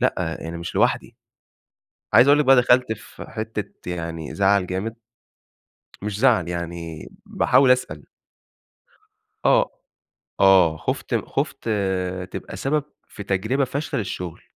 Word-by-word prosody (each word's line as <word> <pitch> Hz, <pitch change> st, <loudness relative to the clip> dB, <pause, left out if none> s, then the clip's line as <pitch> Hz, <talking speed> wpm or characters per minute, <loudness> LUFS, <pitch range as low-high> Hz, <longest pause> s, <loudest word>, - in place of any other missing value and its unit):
لأ 90 Hz, -10 st, -1 dB
أنا 85 Hz, -, -5 dB
مش 85 Hz, 0 st, -6 dB
لوحدي، -, -, +1 dB, 1.0 s
عايز 130 Hz, -, +7 dB
أقول 145 Hz, +1 st, +6 dB
لِك 150 Hz, -, +2 dB
بقى 135 Hz, -, +7 dB
دخلت 125 Hz, -1 st, +4 dB
في 110 Hz, -, -12 dB
حتّة 110 Hz, -4 st, -6 dB
يعني 85 Hz, -3 st, -5 dB
زعل 100 Hz, -1 st, +3 dB
جامد، 100 Hz, +5 st, -3 dB, 1.1 s
مش 105 Hz, -1 st, -3 dB
زعل 85 Hz, -2 st, +3 dB
يعني 85 Hz, -2 st, -5 dB, 0.2 s
باحاول 135 Hz, -2 st, +3 dB
أسأل. 125 Hz, 0 st, +1 dB, 1.4 s
آه -, -, +4 dB, 0.7 s
،آه 95 Hz, -5 st, +5 dB
خُفت -, -, -2 dB
خُفت -, -, -3 dB, 0.6 s
تبقى -, -, -7 dB
سبب 145 Hz, +7 st, 0 dB, 0.2 s
في 100 Hz, -, -9 dB
تجربة 110 Hz, +8 st, 0 dB
فاشلة 140 Hz, -1 st, -3 dB
للشغل. 90 Hz, -4 st, -5 dB
100 Hz, 120 wpm, -23 LUFS, 85-125 Hz, 1.4 s, عايز